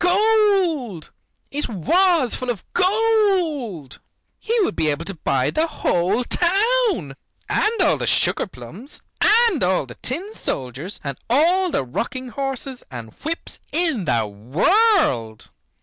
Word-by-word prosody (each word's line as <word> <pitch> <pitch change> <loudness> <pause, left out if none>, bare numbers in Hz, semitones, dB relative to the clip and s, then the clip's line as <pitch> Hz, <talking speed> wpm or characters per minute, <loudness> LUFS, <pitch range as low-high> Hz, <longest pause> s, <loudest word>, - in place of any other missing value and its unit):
Gold! 365 - +2 0.4
It 295 +2 -3
was 310 - +2
full 255 - -3
of 225 -7 -3
gold. 365 - +1 0.4
He 465 +1 -1
would 375 - 0
be 155 - 0
able 150 +3 -2
to 195 - -3
buy 135 -6 0
the 315 +2 +1
whole 200 - 0
town, 390 - +1 0.3
and 445 +2 +1
all - - +3
the - - -3
sugar - - +2
plums, 180 - -11 0.2
and 445 - +4
all 180 -5 +1
the 120 - -11
tin 350 - -3
soldiers, 135 - -4
and 140 -3 -5
all 350 +9 +3
the 140 - -1
rocking 255 - -4
horses 270 -1 -4
and 115 -4 -9
whips 330 +2 -5
in 315 - 0
the 115 -6 +1
world. 125 - +1
270 Hz, 135 wpm, -21 LUFS, -, 0.4 s, and